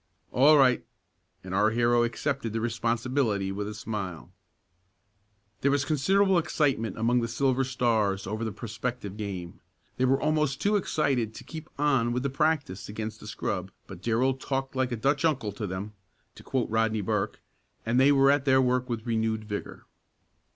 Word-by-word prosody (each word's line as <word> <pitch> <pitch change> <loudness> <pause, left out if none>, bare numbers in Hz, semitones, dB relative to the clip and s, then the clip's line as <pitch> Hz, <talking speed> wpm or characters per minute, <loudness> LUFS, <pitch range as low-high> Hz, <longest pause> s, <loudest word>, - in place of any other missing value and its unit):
"All 150 +4 +6
right!" 130 -3 +4 0.6
and 95 0 -7
our 105 +3 +4
hero 120 +1 +3
accepted 120 -1 -2
the 115 - -1
responsibility 115 -2 0
with 100 +1 -3
a 105 - -6
smile. 100 -5 -5 1.3
There 140 - +2
was 140 0 +1
considerable 190 +6 +3
excitement 135 - 0
among 120 +2 +2
the 115 - -1
Silver 130 +2 +1
Stars 110 -6 0
over 110 +3 -3
the 110 - -2
prospective 115 -1 -5
game. 95 -5 -6 0.4
They 130 - +2
were 135 +1 +3
almost 150 -3 +1
too 205 +1 +2
excited 135 - 0
to - - -9
keep 160 -1 -9
on 135 -5 +2
with 125 +1 -1
the 140 - -1
practice 140 - 0
against 110 +1 -5
the - - -11
scrub, 95 -2 -3 0.2
but 95 -2 -10
Darrell 120 +5 +2
talked 135 0 -3
like 130 -1 0
a - - 0
"Dutch 140 +6 +1
uncle" 130 -10 +1
to 105 +1 -5
them, 95 +3 -5 0.4
to - - -14
quote 130 -5 -2
Rodney 110 -1 +1
Burke, 95 - -1 0.5
and 115 +3 +2
they 135 +2 +6
went 135 0 +5
at 145 -1 0
their 130 -1 +5
work 125 0 +1
with 115 -2 -3
renewed 110 -2 0
vigor. 105 -1 -6
120 Hz, 170 wpm, -27 LUFS, 110-135 Hz, 1.3 s, All